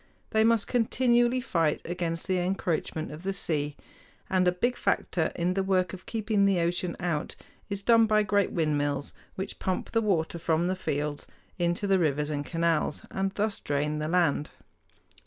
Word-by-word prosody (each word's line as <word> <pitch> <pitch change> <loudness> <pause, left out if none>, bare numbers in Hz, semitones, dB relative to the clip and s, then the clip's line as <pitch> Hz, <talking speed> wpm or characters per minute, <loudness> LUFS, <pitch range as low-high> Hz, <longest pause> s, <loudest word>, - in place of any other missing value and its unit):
They 220 -1 +4
must 225 -2 +3
continually 240 +1 +2
fight 165 -10 +1
against 170 -1 -2
the 185 -1 +1
encroachment 175 -4 -2
of 150 +2 -8
the 195 +2 -2
sea, 150 -6 -2 0.5
and 185 -1 +3
a - - +5
big 240 +8 0
factor 165 -8 0
in 175 +1 0
the 195 - 0
work 185 -2 +1
of 185 - -10
keeping 215 -3 +1
the 195 -3 +3
ocean 170 +1 -1
out 170 -5 -2 0.3
is 200 -1 -3
done 230 0 +5
by 215 0 +3
great 205 -1 +1
windmills, 145 -3 0 0.2
which 190 +1 -5
pump 185 -1 -2
the 225 - +2
water 170 -5 0
from 165 +1 +1
the 185 +1 0
fields 145 -4 -3 0.3
into 175 +3 0
the 195 -1 +3
rivers 150 -2 0
and 145 -1 -3
canals, 165 -3 0
and 195 0 -1
thus 210 0 0
drain 150 +1 -1
the 155 - -2
land. 160 -4 +1
180 Hz, 175 wpm, -28 LUFS, 160-200 Hz, 0.5 s, a